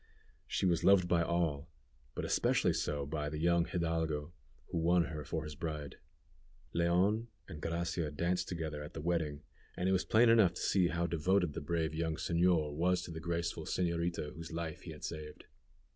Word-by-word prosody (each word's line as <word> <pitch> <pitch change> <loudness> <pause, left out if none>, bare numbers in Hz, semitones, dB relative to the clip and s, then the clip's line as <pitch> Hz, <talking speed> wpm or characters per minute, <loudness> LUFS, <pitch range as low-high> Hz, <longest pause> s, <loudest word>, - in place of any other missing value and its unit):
She - - 0
was 85 -3 +2
loved 95 -2 +6
by 85 -1 +3
all, 80 -3 0 0.5
but - - -3
especially - - +2
so 75 -2 -1
by 75 +1 -3
the 75 - -4
young 85 +1 +3
hidalgo, 80 -2 -1 0.4
who 85 - -1
won 85 +1 +4
her 75 -2 -5
for 80 +4 -3
his 75 -1 -6
bride. 75 -2 -5 0.8
Leon 90 +7 +2 0.2
and 75 - -8
Gracia 85 -1 -1
danced 85 +5 -1
together 80 -4 -4
at 75 - -9
the - - -4
wedding, 80 -3 -1 0.3
and 90 - 0
it - - +3
was 95 -1 +2
plain 115 +2 +5
enough 105 -7 +5
to - - -5
see 95 -3 +3
how 85 0 0
devoted 85 0 +1
the - - -4
brave 80 0 -1
young 80 0 -1
señor 85 -2 +2
was 90 +3 +1
to 85 - -7
the 80 - -5
graceful 85 -1 -2
señorita 85 -3 -1
whose 85 +1 -8
life 80 -1 -4
he 85 - -8
had 75 - -11
saved. 75 -2 -6
85 Hz, 185 wpm, -34 LUFS, 75-85 Hz, 0.8 s, loved